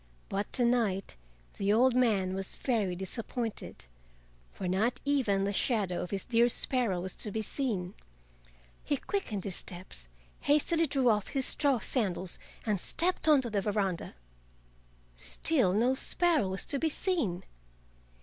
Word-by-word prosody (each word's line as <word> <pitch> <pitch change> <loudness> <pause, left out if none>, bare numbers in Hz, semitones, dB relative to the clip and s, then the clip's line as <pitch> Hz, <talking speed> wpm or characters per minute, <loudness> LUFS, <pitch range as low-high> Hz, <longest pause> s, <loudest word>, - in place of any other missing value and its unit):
But 200 +1 -2
to 245 - +2
night 220 - 0 0.4
the 200 0 +1
old 250 +4 +4
man 210 -7 +2
was 190 0 -3
very 215 -8 0
disappointed, 225 - -5 0.7
for 185 - -5
not 205 +7 +1
even 250 -9 +2
the 200 +1 -1
shadow 200 -5 +1
of 180 - -5
his 195 -2 -3
dear 235 0 +3
sparrow 240 -7 +1
was 185 +1 -4
to 215 - -3
be 220 +2 -3
seen. 205 -8 -2 0.9
He 285 - 0
quickened 245 - -3
his 190 -3 -2
steps, 175 - -9 0.3
hastily 320 +3 +2
drew 265 -3 +2
off 210 -3 +1
his 270 -1 0
straw 280 -3 +3
sandals, 190 -7 -2 0.3
and 210 -4 0
stepped 350 -1 0
on 295 -3 +6
to 240 -3 -4
the 205 -2 +1
veranda. 195 -4 -2 1.0
Still 180 - 0
no 235 +7 +3
sparrow 315 - +2
was 190 +1 0
to 280 - -2
be 320 - +1
seen. 285 - 0
220 Hz, 150 wpm, -30 LUFS, 190-260 Hz, 1.0 s, on